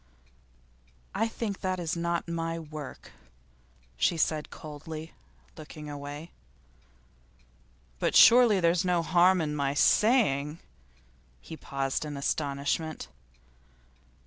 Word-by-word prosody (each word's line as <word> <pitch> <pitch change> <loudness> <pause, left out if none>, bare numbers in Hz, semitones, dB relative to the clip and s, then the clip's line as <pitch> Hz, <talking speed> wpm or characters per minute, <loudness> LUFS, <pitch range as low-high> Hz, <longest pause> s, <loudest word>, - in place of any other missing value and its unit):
'I 225 - 0
think 220 -3 -5
that 185 -1 -1
is 170 -1 -2
not 170 0 -2
my 165 0 -3
work,' 155 -3 -9 0.9
she 165 - +1
said 155 -1 0
coldly, 155 +1 -9 0.4
looking 150 -1 -9
away. 145 +3 -8 1.7
'But - - 0
surely 235 -4 +7
there's 170 0 +2
no 180 -2 +1
harm 180 +2 +4
in 150 -1 -2
my 140 -1 -1
saying 155 - +3 0.4
' - - -33 0.3
he 160 - -10
paused 135 -2 -3
in 150 -2 -6
astonishment. 145 +2 -2
160 Hz, 105 wpm, -28 LUFS, 145-175 Hz, 1.7 s, surely